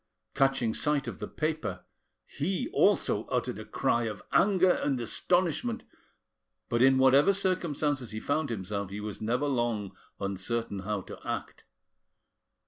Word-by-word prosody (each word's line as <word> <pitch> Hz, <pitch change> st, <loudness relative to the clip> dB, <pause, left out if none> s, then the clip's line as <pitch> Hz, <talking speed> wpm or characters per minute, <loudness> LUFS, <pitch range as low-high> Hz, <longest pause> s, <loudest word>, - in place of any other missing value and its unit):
Catching 135 Hz, -5 st, +2 dB
sight 150 Hz, +1 st, 0 dB
of -, -, -6 dB
the -, -, -4 dB
paper, 155 Hz, -, -3 dB, 0.4 s
he 180 Hz, +6 st, -2 dB
also -, -, +2 dB
uttered -, -, -1 dB
a -, -, -7 dB
cry 120 Hz, 0 st, +1 dB
of 105 Hz, -3 st, -5 dB
anger 185 Hz, -1 st, +4 dB
and 135 Hz, -6 st, 0 dB
astonishment, 180 Hz, -, 0 dB, 0.9 s
but 120 Hz, 0 st, +1 dB
in 130 Hz, +1 st, +6 dB
whatever 135 Hz, +7 st, +6 dB
circumstances 155 Hz, -, 0 dB
he 110 Hz, -, -5 dB
found 145 Hz, +4 st, -1 dB
himself 100 Hz, -2 st, -3 dB
he 100 Hz, +2 st, -5 dB
was 105 Hz, -1 st, -6 dB
never 120 Hz, +6 st, 0 dB
long 120 Hz, -8 st, -1 dB, 0.2 s
uncertain 100 Hz, +2 st, -2 dB
how 100 Hz, +1 st, -2 dB
to -, -, -10 dB
act. -, -, -5 dB
130 Hz, 135 wpm, -29 LUFS, 105-155 Hz, 0.9 s, in